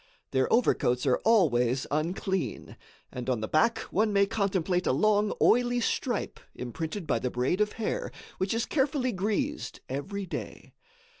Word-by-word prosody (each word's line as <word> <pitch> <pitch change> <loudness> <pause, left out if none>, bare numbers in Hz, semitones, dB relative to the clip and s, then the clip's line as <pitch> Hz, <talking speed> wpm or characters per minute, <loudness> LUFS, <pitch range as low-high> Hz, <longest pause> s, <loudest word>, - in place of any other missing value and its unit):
Their 130 -1 +1
overcoats 125 - +2
are 130 -2 +3
always 135 - +3
unclean, 175 +5 -2 0.4
and, 125 0 -5
on 125 -3 +1
the 110 - -2
back, 230 - +3
one 215 +2 +2
may 200 0 +4
contemplate 195 -4 0
a - - +4
long 210 +8 +2
oily 245 +1 +3
stripe 240 0 -1 0.2
imprinted 160 - -5
by 150 - +1
the 125 - -1
braid 125 +11 0
of 210 0 +1
hair, - - -3 0.3
which 190 +4 0
is 230 - 0
carefully 265 -3 0
greased 220 - -2
every 195 +10 -4
day. 185 - -7
195 Hz, 150 wpm, -28 LUFS, 140-225 Hz, 0.4 s, may